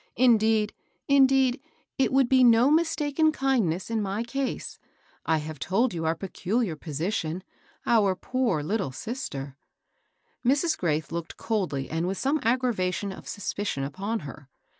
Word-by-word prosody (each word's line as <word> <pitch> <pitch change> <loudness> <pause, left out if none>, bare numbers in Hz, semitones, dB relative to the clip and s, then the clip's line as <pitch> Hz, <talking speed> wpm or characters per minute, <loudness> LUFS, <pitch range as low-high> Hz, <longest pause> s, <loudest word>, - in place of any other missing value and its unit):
"Indeed 220 -3 +3 0.2
— - - -46
indeed, 270 -1 +4 0.4
it 265 - +3
would 265 -1 +4
be 260 0 +5
no 240 +3 +6
mistaken 315 -1 +2
kindness 230 - 0
in 225 -1 0
my 200 +2 -2
case. 265 +3 -4 0.5
1 160 -1 +2
have 155 -1 -7
told 210 - +1
you 165 -2 -3
our 160 +1 +1
peculiar 190 +2 -2
position 165 +3 -3 0.2
— - - -33
our 205 -5 +3
poor 240 - -1
little 195 -2 -1
sister 140 - -6 0.3
" - - -46
— - - -44
Mrs. 285 +6 +2
Graith 155 -3 -1
looked 170 -1 -5
coldly 180 -12 -2
and 165 +2 -2
with 190 +1 -2
some 285 +3 +1
aggra 245 +1 +1
vation 185 0 -2
of - - -13
suspicion 200 -7 -3
upon 195 +10 -3
her. 145 -1 -10
210 Hz, 160 wpm, -26 LUFS, 165-255 Hz, 0.5 s, no